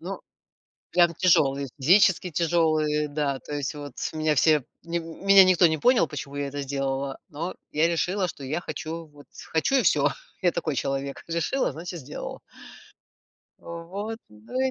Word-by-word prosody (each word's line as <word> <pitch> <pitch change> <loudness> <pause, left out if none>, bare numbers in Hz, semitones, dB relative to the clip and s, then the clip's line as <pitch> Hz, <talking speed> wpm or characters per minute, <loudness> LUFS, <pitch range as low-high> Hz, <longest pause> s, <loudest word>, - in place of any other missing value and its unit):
Ну, - - -6 0.7
прям 175 -1 +4
тяжелые, 140 -6 +3
физически 180 +4 +4
тяжелые, 155 -2 +1
да, 145 -2 -1
то 150 - -9
есть 145 0 -3
вот 145 -2 -8 0.2
меня 155 -1 +1
все, 150 0 +4 0.2
нем 170 0 -3 0.2
меня 195 -1 +9
никто 185 -2 +5
не 160 0 0
понял, 240 - +4
почему 140 -1 -7
я 145 0 -2
это 140 0 -4
сделала, 135 0 -3
но 165 +5 -4 0.2
я 155 +2 +3
решила, 180 +3 0
что 145 - -8
я 150 +6 -2
хочу, 165 +1 -6
вот 145 -2 -17 0.2
хочу 165 - +1
и 265 - +4
всё. - - +4 0.3
Я 180 -2 +3
такой 155 -4 -2
человек. 135 +1 -3
Решила, 170 - 0
значит, 170 +1 -7
сделала. 145 +2 -7 1.2
Вот, 190 +7 -6
ну, 105 - -6
и 265 0 +2
155 Hz, 160 wpm, -26 LUFS, 145-175 Hz, 1.2 s, меня